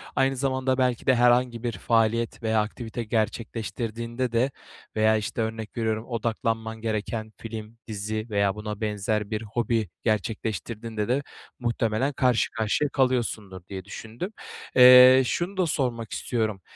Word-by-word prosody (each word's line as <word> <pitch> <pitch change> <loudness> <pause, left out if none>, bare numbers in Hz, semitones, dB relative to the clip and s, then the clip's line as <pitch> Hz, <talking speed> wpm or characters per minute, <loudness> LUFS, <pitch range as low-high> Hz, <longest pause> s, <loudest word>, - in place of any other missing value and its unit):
aynı 135 0 +2
zamanda 130 0 0
belki 125 -2 +1
de 130 - +5
herhangi 120 -1 +3
bir 120 - 0
faaliyet 115 +1 0
veya 110 -1 +2
aktivite 115 +2 -5
gerçekleştirdiğinde 115 +2 -2
de 120 +4 +1 0.4
veya, 110 0 +4
işte, 110 +2 -3
örnek 110 0 -4
veriyorum, 110 -1 -1
odaklanman 115 -1 -2
gereken 110 0 -3
film, 110 0 -8
dizi 110 +1 -4
veya 100 -1 +1
buna 105 0 -6
benzer 105 0 -1
bir 110 0 -1
hobi 115 -1 -1
gerçekleştirdiğinde 110 0 -2
de 135 +4 +1 0.4
muhtemelen 120 +2 0
karşı 125 -3 +2
karşıya 110 +6 0
kalıyorsundur 120 -8 0
diye 95 -2 -6
düşündüm. 115 - -7 0.4
Eee, 125 +1 +9
şunu 175 +9 -2
da 185 - +3
sormak 125 -8 -2
istiyorum: 110 -5 -2
115 Hz, 135 wpm, -26 LUFS, 110-125 Hz, 0.4 s, Eee